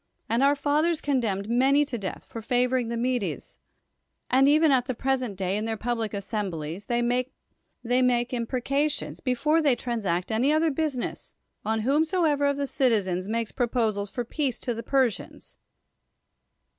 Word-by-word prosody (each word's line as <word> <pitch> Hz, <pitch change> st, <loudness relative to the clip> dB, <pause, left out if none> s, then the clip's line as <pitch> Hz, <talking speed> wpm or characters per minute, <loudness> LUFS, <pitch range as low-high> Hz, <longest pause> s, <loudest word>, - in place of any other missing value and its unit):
.Vnd 230 Hz, +2 st, +2 dB
our 285 Hz, +1 st, +5 dB
fathers 305 Hz, +3 st, +1 dB
condemned 225 Hz, -10 st, -1 dB
]nany 270 Hz, +5 st, +3 dB
to 275 Hz, -, -5 dB
death 200 Hz, -5 st, -5 dB
for 230 Hz, -, -8 dB
favoring 250 Hz, +1 st, +1 dB
the 235 Hz, 0 st, -3 dB
]\redes; 245 Hz, -3 st, -2 dB, 0.7 s
and 265 Hz, +2 st, +5 dB
even 305 Hz, +1 st, +5 dB
at 255 Hz, -2 st, +3 dB
the 255 Hz, -, -2 dB
present 255 Hz, -4 st, -1 dB
day, 190 Hz, 0 st, -1 dB
in 210 Hz, +1 st, -2 dB
their 225 Hz, -1 st, -2 dB
public 230 Hz, -2 st, -2 dB
assemblies, 195 Hz, -4 st, -4 dB
they 240 Hz, 0 st, +1 dB
make 250 Hz, +2 st, -1 dB, 1.0 s
imprecations, 275 Hz, +5 st, -1 dB
before 300 Hz, +5 st, +1 dB
they 285 Hz, -5 st, +3 dB
transact 205 Hz, -8 st, -2 dB
any 240 Hz, +6 st, +2 dB
other 315 Hz, +1 st, +3 dB
business, 285 Hz, -4 st, -3 dB, 0.3 s
on 220 Hz, +1 st, 0 dB
whomsoever 300 Hz, -, +2 dB
of 280 Hz, 0 st, 0 dB
the 285 Hz, -, -1 dB
citizens 200 Hz, -9 st, 0 dB
makes 230 Hz, +1 st, -2 dB
pro])osals 225 Hz, -5 st, 0 dB
for 240 Hz, +4 st, -4 dB
peace 265 Hz, -1 st, -2 dB
to 245 Hz, -, -3 dB
the 230 Hz, -, -5 dB
Persians. 260 Hz, -4 st, -1 dB
245 Hz, 150 wpm, -26 LUFS, 220-280 Hz, 1.0 s, our